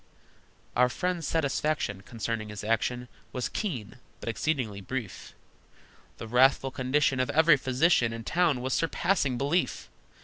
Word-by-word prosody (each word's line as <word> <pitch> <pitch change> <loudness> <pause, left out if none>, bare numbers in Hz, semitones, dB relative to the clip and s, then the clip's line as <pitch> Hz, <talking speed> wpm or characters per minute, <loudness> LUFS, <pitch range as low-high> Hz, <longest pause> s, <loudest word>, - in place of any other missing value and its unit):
Our 125 +1 +4
friend's 180 +3 -2
satisfaction 150 -9 -1
Concerning 110 0 -4
his 105 -1 -7
action 115 +3 -1 0.2
Was 125 - -2
keen, 130 - -4 0.2
but - - -5
exceedingly 115 -6 -2
brief. 115 -1 -6 0.8
The 115 - -7
wrathful 130 +3 +4
condition 130 +1 +1
Of 130 - +1
every 160 0 +6
physician 130 -2 +2
In 115 0 -6
town 165 -3 +1
was 130 0 -2
surpassing 165 -5 +1
belief! 145 +7 -1
130 Hz, 130 wpm, -28 LUFS, 115-155 Hz, 0.8 s, every